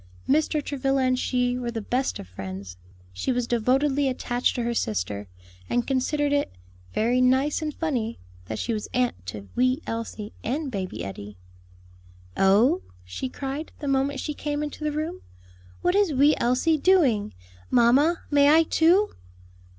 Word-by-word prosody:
Mr. 305 +1 +2
Travilla 270 -1 0
and 255 0 +2
she 250 -1 0
were 240 -1 -3
the 230 -1 -3
best 250 +5 -1
of 95 - -9
friends; 95 0 -7 0.4
she 90 - -1
was 245 -1 0
devotedly 265 +4 +2
attached 245 -1 -1
to 245 - -1
her 235 0 -1
sister, 100 - -2 0.4
and 245 -1 +1
considered 285 +2 0
it 285 - +1 0.4
"very 240 - +2
nice 265 +5 +2
and 310 -1 -2
funny," 245 -9 -2 0.3
that 110 +3 -5
she 235 - -2
was 210 -1 -3
aunt 245 - 0
to 100 +1 -7
wee 255 +3 +2
Elsie 225 -2 -5
and 275 +4 -2
baby 190 - -4
Eddie. 100 +1 -8 1.0
"Oh," 220 - +4 0.2
she 90 - -5
cried, 275 +4 -5
the 290 - -6
moment 275 0 +1
she 300 - -3
came 295 0 -3
into 300 +1 -6
the 300 - 0
room, 315 +5 -4 0.6
"what 355 - +3
is 400 -3 +3
wee 285 +3 +5
Elsie 260 +6 +2
doing? 265 - +3 0.3
Mamma, 270 +8 +4
may 285 0 +5
I, 320 +2 +6
too?" 350 +6 +3
255 Hz, 160 wpm, -25 LUFS, 225-295 Hz, 1.0 s, I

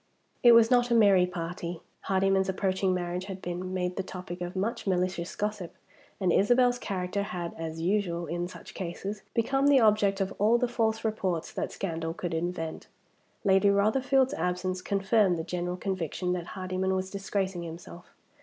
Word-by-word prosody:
It 240 -1 +8
was 230 0 +6
not 245 -1 +4
a 235 - +3
merry 200 -5 +5
party. 175 -1 -5 0.3
Hardyman's 195 0 +2
approaching 190 0 0
marriage 180 0 -2
had 190 -1 -6
been 180 +1 -5
made 180 -1 -2
the - - +1
topic 180 -1 -7
of 175 +1 -4
much 225 +3 -2
malicious 180 -2 -1
gossip, 210 -4 -3 0.4
and 185 -4 +2
Isabel's 245 +4 +4
character 190 -2 -2
had, 175 -4 -4
as 165 0 -5
usual 175 -2 0
in 175 +2 -3
such 185 - -11
cases, 195 +3 -5
become 270 +4 +2
the 285 -2 +6
object 210 -3 +3
of 195 0 -1
all 220 +4 +4
the 250 +1 +1
false 225 -2 0
reports 190 -6 -1
that - - -3
scandal 165 -3 -3
could 175 -2 -4
invent. 165 -1 -3 0.6
Lady 195 0 +4
Rotherfield's 255 +6 +3
absence 180 +1 -2
confirmed 195 -1 +2
the 160 - -3
general 180 +1 -3
conviction 180 -1 -2
that 175 -1 -4
Hardyman 185 0 -1
was 185 0 -3
disgracing 195 -2 -2
himself. 170 +1 -9
190 Hz, 165 wpm, -28 LUFS, 175-205 Hz, 0.6 s, It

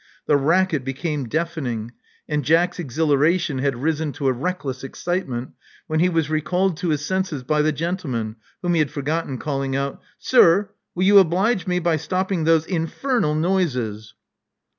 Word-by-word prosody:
The 150 - +3
racket 160 +1 +2
became 135 0 -3
deafening; 140 -9 -2 0.4
and 150 -1 -1
Jack's 165 +6 +2
exhilaration 150 0 +1
had 135 -2 -1
risen 160 -1 0
to 140 - -5
a 130 - +3
reckless 135 -2 -4
excitement, 135 -4 -3 0.3
when 155 -3 -1
he 180 +2 +4
was 165 -4 +1
recalled 175 +4 0
to 180 0 -2
his 150 -1 0
senses 185 -7 -2
by 150 +4 +1
the 155 +1 +2
gentleman, 140 - -3 0.3
whom 175 0 +1
he 165 - +2
had 150 -3 +2
forgot 150 +4 -2
ten, 130 - -4
calling 135 -1 -2
out: 140 0 -3 0.2
Sir: 205 -4 +4 0.2
will 180 - 0
you 200 +1 +7
oblige 190 +3 +2
me 180 0 +1
by 170 -2 +1
stopping 185 +1 -1
those 160 -1 +4
in'/emel 170 - -1
noises." 125 - -1
155 Hz, 160 wpm, -22 LUFS, 140-180 Hz, 0.4 s, you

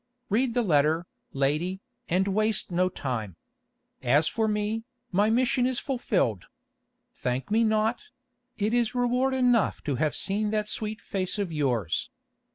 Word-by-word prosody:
Read 235 +3 +1
the 245 - +3
letter, 160 -1 +2 0.3
lady, 150 +8 0 0.3
and 185 +3 +2
waste 215 0 +1
no 180 +1 +2
time. 115 - -4 0.7
As 145 +5 +3
for 220 -1 0
me, 210 +1 -1 0.3
my 205 +3 +3
mission 250 +2 +2
is 260 -1 -1
fulfilled. 200 - -1 0.7
Thank 125 +8 -3
me 225 +2 +4
not; 220 +1 +1 0.5
it 215 +1 0
is 240 0 +1
reward 250 +2 +1
enough 245 -4 +2
to 140 -4 -1
have 155 +3 0
seen 210 +2 0
that 210 0 -1
sweet 215 0 -4
face 190 0 -3
of 200 -4 -2
yours. 125 - 0
210 Hz, 145 wpm, -27 LUFS, 155-225 Hz, 0.7 s, me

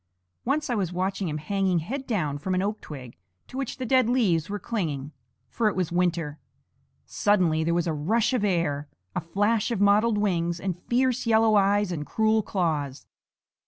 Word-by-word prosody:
Once 295 +4 0
I - - +2
was 195 -6 -1
watching 190 0 -2
him 150 - -2
hanging 190 +3 0
head 260 - -4
down 155 - -1
from 185 +5 -1
an 185 - +1
oak 210 +2 -2
twig 130 - -9 0.3
to - - -12
which 270 -2 -3
the 255 - -4
dead 255 -1 +3
leaves 195 -11 +2
were 205 - -2
clinging; 155 - -3 0.4
for 230 - 0
it 210 - 0
was 180 -3 -1
winter. 170 -4 0 0.7
Suddenly 180 -7 +2
there 170 +1 +1
was 175 0 +1
a 165 - 0
rush 220 - +1
of 245 -5 +1
air, 165 -7 0 0.3
a - - 0
flash 205 +7 +1
of 230 -5 -1
mottled 210 +2 +4
wings 175 -4 0
and 180 -1 -4
fierce 255 0 +1
yellow 220 -1 +4
eyes 200 -1 +3
and 155 -4 -3
cruel 220 +6 +2
claws. 155 -9 -2
190 Hz, 185 wpm, -26 LUFS, 165-220 Hz, 0.7 s, mottled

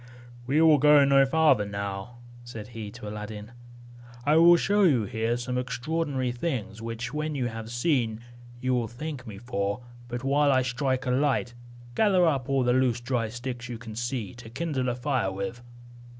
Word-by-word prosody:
"We 140 +4 +2
will 155 -3 +6
go 150 0 +6
no 135 0 +5
farther 150 -6 +4
now," 100 +3 -5 0.3
said 115 -3 -8
he 110 -3 -7
to 105 - -9
Aladdin; 105 +1 -7 0.7
"I 150 +1 +4
will 170 +1 +8
show 205 +4 +2
you 140 - +4
here 115 +2 -1
some 125 +1 -2
extraordinary 130 +1 -2
things, 120 -5 -4
which, 115 +3 -5
when 150 0 -2
you 130 -3 -1
have 115 -1 -7
seen, 120 -3 0 0.4
you 130 0 0
will 120 -2 0
thank 130 +2 -7
me 105 -3 -8
for: 100 -1 -3 0.3
but 120 +1 -5
while 140 +1 +3
I 130 -1 +3
strike 130 +1 -1
a 125 - 0
light, 130 -2 +1 0.4
gather 185 - +4
up 140 -5 0
all 135 -1 +2
the 125 0 +3
loose 125 -2 +2
dry 120 -2 -1
sticks 120 +1 -6
you 120 - -5
can 110 -2 -9
see, 120 0 -3
to 120 -1 -11
kindle 130 0 -2
a 120 - -1
fire 125 -6 -1
with." 100 +6 -5
125 Hz, 180 wpm, -27 LUFS, 115-140 Hz, 0.7 s, will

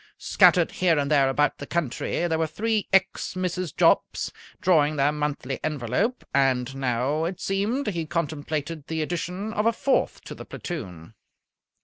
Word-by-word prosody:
Scattered 175 -3 +4
here 175 -3 +2
and 140 0 0
there 140 -3 +4
about 145 +2 +1
the 140 - -7
country 170 +2 -1
there 160 -1 0
were 160 - +1
three 215 +6 -1
ex 195 0 +1
Mrs. 180 -3 -3
Jopps, - - +2 0.3
drawing 155 -4 +3
their 140 0 +3
monthly 150 -3 -3
envelope, 150 - -1
and 135 -1 +2
now, 135 +3 0
it 180 +2 -4
seemed, 210 +8 -1
he 170 -5 -3
contemplated 155 -1 -3
the 160 -1 -1
addition 180 +6 -4
of 210 +1 +1
a - - +5
fourth 270 +4 0
to - - -8
the - - -9
platoon. 95 - -7
155 Hz, 155 wpm, -25 LUFS, 140-185 Hz, 0.3 s, a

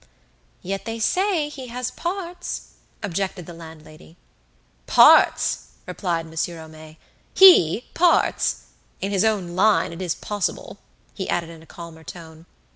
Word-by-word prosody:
"Yet 195 +1 -4
they 225 0 -4
say 360 - +1
he 275 -4 -9
has 250 +1 -4
parts," 355 0 -5 0.3
objected 190 -2 -3
the 175 - -10
landlady. 160 0 -14 0.7
"Parts!" 60 - +5 0.2
replied 170 -3 -3
Monsieur 165 +1 -4
Homais; 155 0 -13 0.4
"he, 250 - +7
parts! 345 0 +2 0.4
In 195 - -3
his 195 0 +1
own 195 -6 -1
line 205 -2 +2
it 170 - -8
is 175 -3 -2
possible," 205 -1 -4 0.3
he 190 - -6
added 170 -1 -2
in 165 -1 -13
a 160 - -18
calmer 165 -2 -11
tone. 160 -1 -12
185 Hz, 130 wpm, -22 LUFS, 165-235 Hz, 0.7 s, he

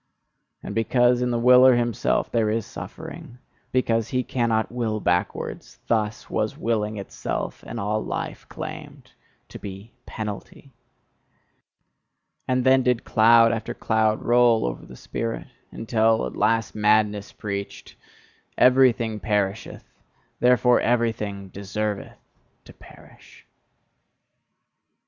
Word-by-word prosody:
And - - -6
because 120 +2 +2
in 125 - 0
the 120 - 0
willer 125 +1 +6
himself 120 -2 0
there 115 -2 +1
is 110 0 -1
suffering, 120 - -9 0.3
because 115 -3 +1
he 125 +1 -1
cannot 115 -3 0
will 115 -3 -2
backwards 90 -2 -2
thus 110 -1 -1
was - - -2
Willing 110 -2 -1
itself, 100 - -5
and - - -6
all 105 +2 -1
life, - - -5
claimed - - -9 0.4
to - - -10
be 100 +3 -9
penalty! 110 +5 -7 1.8
And 130 0 +1
then 130 0 +5
did 125 -2 +1
cloud 115 +1 +5
after 115 -1 -4
cloud 110 -1 0
roll 120 -1 +4
over - - -5
the 65 - -12
spirit, 115 - -5 0.2
until 110 - +1
at 65 - -6
last 115 -1 +1
madness 105 -1 +1
preached: 100 -1 -6 0.6
"Everything 125 -4 +4
perisheth, 105 -1 -2 0.6
therefore 125 0 +4
everything 110 -5 -1
deserveth 100 +2 -4 0.5
to - - -14
perish!" - - -18
115 Hz, 110 wpm, -24 LUFS, 105-120 Hz, 1.8 s, willer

